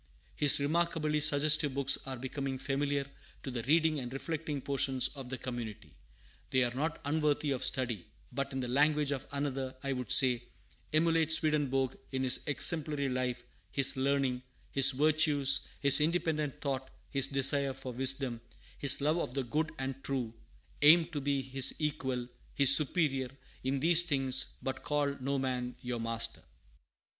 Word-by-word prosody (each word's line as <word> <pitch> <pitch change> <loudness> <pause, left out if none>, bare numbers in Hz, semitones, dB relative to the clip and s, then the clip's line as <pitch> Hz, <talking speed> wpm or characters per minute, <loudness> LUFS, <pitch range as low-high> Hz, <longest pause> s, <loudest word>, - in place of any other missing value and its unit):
His 145 -1 +5
remarkably 155 0 0
suggestive 150 -1 +2
books 140 -1 +2
are 130 -1 -4
becoming 135 +1 -5
familiar 140 +1 -2 0.4
to 135 - -5
the 120 -2 -4
reading 155 +3 +2
and 120 -2 -7
reflecting 150 +1 -4
portion 135 0 -1 0.2
of 135 -3 -9
the 130 - -4
community. 120 -5 -7 0.6
They 130 0 +2
are 120 -1 -2
not 150 +5 -3
unworthy 150 0 0
of 130 -1 -2
study; 125 -7 -1 0.2
but, 140 0 -4
in 135 0 -4
the 125 - -4
language 150 +3 +1
of 140 -1 -4
another, 135 -2 -4
I 140 0 -2
would 125 -3 -5
say, 125 -3 +5 0.5
"Emulate 160 0 +2
Swedenborg 145 -5 +1 0.2
in 130 -1 -2
his 130 - +3
exemplary 150 -2 0
life, 125 -1 -3 0.3
his 135 +5 +2
learning, 135 -1 0 0.3
his 135 -1 +8
virtues, 145 -1 +2
his 140 +1 +9
independent 155 -3 -1
thought, 135 -2 -3 0.2
his 135 -1 +2
desire 140 0 +2
for 125 - -8
wisdom, 130 -1 +1 0.4
his 140 0 +5
love 155 +4 +1
of 125 - -5
the 135 - -1
good 155 +6 -2
and 135 0 -5
true; 125 -5 -3 0.5
aim 160 +3 +6
to 150 -4 -5
be 140 -1 -1
his 130 0 +1
equal, 135 -5 -3 0.3
his 135 -1 +6
superior, 140 -4 0 0.3
in 135 +1 -1
these 170 +3 +4
things; 135 -5 +1
but 130 0 -4
call 145 -1 -1
no 140 +2 -1
man 125 -2 -3
your 125 -1 -5
master." 115 0 -2
140 Hz, 155 wpm, -31 LUFS, 130-150 Hz, 0.6 s, his